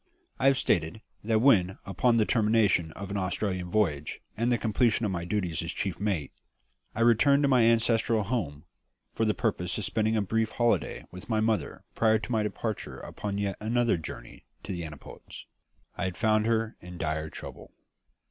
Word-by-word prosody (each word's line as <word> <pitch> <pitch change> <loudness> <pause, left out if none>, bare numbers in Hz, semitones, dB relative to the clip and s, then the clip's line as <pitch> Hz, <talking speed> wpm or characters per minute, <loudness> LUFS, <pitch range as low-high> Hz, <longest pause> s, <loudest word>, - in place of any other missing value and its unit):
I 135 - +3
have 135 -1 +5
stated 85 -2 0 0.2
that 110 0 +2
when, 95 -8 +4
upon 115 +5 +2
the 110 - +3
termination 105 -8 +2
of 100 0 -7
an 100 - -2
Australian 95 -1 -2
voyage 75 -8 0 0.2
and 115 +2 0
the 120 - +3
completion 115 0 +1
of 100 - -1
my 85 -2 -3
duties 90 -3 -1
as 85 +1 -4
chief 95 -3 -3
mate, 95 -9 -1 0.6
I - - -2
returned 135 +5 +5
to - - +4
my 130 -3 +4
ancestral 115 -1 +3
home 95 - -3 0.5
for 115 - 0
the 105 - +1
purpose 90 -6 -1
of 105 - -2
spending 110 0 +1
a 105 - +1
brief 110 +3 -1
holiday 120 -1 0
with 90 +4 -11
my 110 -2 +1
mother 110 -1 -1
prior 110 -1 +3
to 110 +3 -7
my 110 -2 +2
departure 105 0 -4
upon 100 -1 -5
yet 100 -1 -2
another 120 +2 +1
journey 80 -7 -9 0.2
to - - -6
the 85 -2 -4
antipodes, 75 -3 -11 0.5
I - - -2
had 95 -1 -4
found 110 -1 +2
her 115 0 0
in 90 0 -9
dire 80 -1 -2
trouble. - - -10
105 Hz, 185 wpm, -28 LUFS, 90-115 Hz, 0.6 s, have